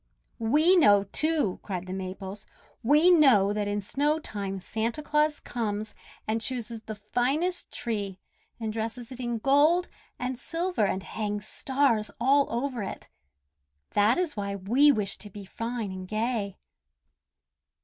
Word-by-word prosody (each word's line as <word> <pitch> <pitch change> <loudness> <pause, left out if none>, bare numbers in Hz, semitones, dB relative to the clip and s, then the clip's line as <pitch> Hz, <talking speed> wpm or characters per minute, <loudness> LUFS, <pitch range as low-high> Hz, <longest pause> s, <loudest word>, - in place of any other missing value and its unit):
"We 300 +11 +4
know, 205 - +6
too," 295 - 0
cried 185 -3 -4
the 185 - -6
Maples. 190 +1 -6 0.3
"We 300 +8 +5
know 250 - +5
that 210 -1 -1
in 205 0 -1
snow 290 +9 +1
time 200 -10 -4
Santa 225 +8 -3
Claus 300 0 +1
comes, 215 -2 -3 0.3
and 220 +1 0
chooses 235 -2 -3
the 220 0 -7
finest 260 - -1
tree, 205 -5 -3 0.4
and 220 -2 -3
dresses 230 +2 -4
it 255 - -8
in 240 -2 -2
gold 295 +9 +3 0.3
and 250 0 -3
silver 335 - -1
and 190 0 -2
hangs 210 -1 -3
stars 260 -6 +1
all 275 +3 +4
over 245 0 -2
it. 195 - -6 0.8
That 210 +3 +3
is 355 -4 -1
why 200 -1 -3
we 240 +10 +4
wish 210 -7 -1
to 210 - -9
be 200 0 -9
fine 230 0 -4
and 185 0 -7
gay." 215 -2 -2
225 Hz, 145 wpm, -27 LUFS, 205-280 Hz, 0.8 s, know